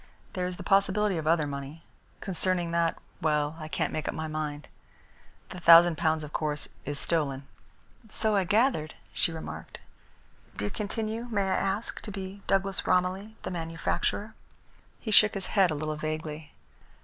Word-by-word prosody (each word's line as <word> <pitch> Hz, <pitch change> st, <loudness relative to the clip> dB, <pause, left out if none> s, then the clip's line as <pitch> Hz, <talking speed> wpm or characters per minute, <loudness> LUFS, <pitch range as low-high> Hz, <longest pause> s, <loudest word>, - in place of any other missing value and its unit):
There 180 Hz, -1 st, -1 dB
is 180 Hz, -1 st, -5 dB
the -, -, -7 dB
possibility 200 Hz, 0 st, +3 dB
of 155 Hz, -, -4 dB
other 160 Hz, -1 st, +3 dB
money. 140 Hz, +3 st, -6 dB, 0.4 s
Concerning 180 Hz, -2 st, 0 dB
that 170 Hz, -1 st, +1 dB, 0.2 s
well, 150 Hz, -1 st, +1 dB
I 155 Hz, -, -6 dB
can't -, -, -1 dB
make 155 Hz, -, -3 dB
up -, -, -2 dB
my 160 Hz, 0 st, -3 dB
mind. 150 Hz, -1 st, -4 dB, 0.8 s
The 185 Hz, -, -7 dB
thousand 170 Hz, 0 st, +8 dB
pounds, 160 Hz, -1 st, +1 dB
of 150 Hz, -, -9 dB
course, 150 Hz, -1 st, +1 dB, 0.2 s
is 145 Hz, 0 st, -3 dB
stolen." 140 Hz, -5 st, 0 dB, 0.6 s
"So 215 Hz, 0 st, +1 dB
I 195 Hz, -, +3 dB
gathered," 205 Hz, -, +1 dB, 0.2 s
she -, -, +3 dB
remarked. 160 Hz, -1 st, -7 dB, 0.8 s
"Do 105 Hz, -, -2 dB
you 105 Hz, -, -2 dB
continue, 220 Hz, +2 st, -3 dB
may 205 Hz, -3 st, +1 dB
I 190 Hz, -1 st, 0 dB
ask, 195 Hz, +3 st, -2 dB
to 210 Hz, -, -6 dB
be 195 Hz, 0 st, -7 dB
Douglas 195 Hz, 0 st, +1 dB
Romilly, 185 Hz, +4 st, +1 dB
the -, -, -4 dB
manufacturer?" 170 Hz, +5 st, -2 dB, 0.7 s
He 220 Hz, -, -4 dB
shook 215 Hz, 0 st, +6 dB
his 195 Hz, -2 st, -3 dB
head 195 Hz, -3 st, +3 dB
a 155 Hz, -, -1 dB
little 155 Hz, +1 st, -3 dB
vaguely. 155 Hz, 0 st, -4 dB
170 Hz, 165 wpm, -28 LUFS, 155-195 Hz, 0.8 s, thousand